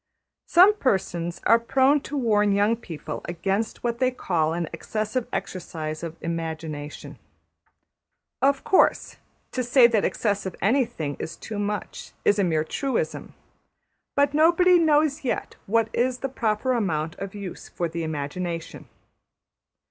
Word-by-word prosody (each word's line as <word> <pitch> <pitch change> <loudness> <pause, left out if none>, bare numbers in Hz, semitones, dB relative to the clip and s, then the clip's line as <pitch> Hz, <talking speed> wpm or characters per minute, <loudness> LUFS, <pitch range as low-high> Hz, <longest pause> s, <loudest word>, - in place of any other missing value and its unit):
Some 370 +5 +7
persons 175 - -1
are 230 - +6
prone 270 +4 +3
to 290 - -3
warn 210 -5 +2
young 205 +3 +3
people 160 -9 -7
against 195 +5 -2
what 235 -1 -1
they 255 -1 +3
call 170 -10 0
an 170 0 -2
excessive 215 +3 -3
exercise 155 -4 -4
of 165 -1 -6
the - - -11
imagination. 160 -3 -5 1.2
Of 275 +1 +2
course, 380 - +2 0.3
to 255 - -1
say 245 +1 +6
that 225 -3 +3
``excessive'' 200 -4 -1
anything 225 - 0
is 160 - -5
too 215 -2 -6
much 205 -1 -4
is 205 - +4
a - - +4
mere 160 -4 +1
truism, 275 - -3 0.8
but 285 0 +3
nobody 345 +4 +5
knows 305 -2 +2
yet 250 - -2
what 225 +2 +2
is 250 +1 +1
the 270 - -4
proper 230 0 0
amount 165 -9 -1
of 195 +1 -6
use 200 -3 -7
for 175 - -2
the 165 +1 -5
imagination. 165 +2 -4
210 Hz, 140 wpm, -25 LUFS, 170-255 Hz, 1.2 s, Some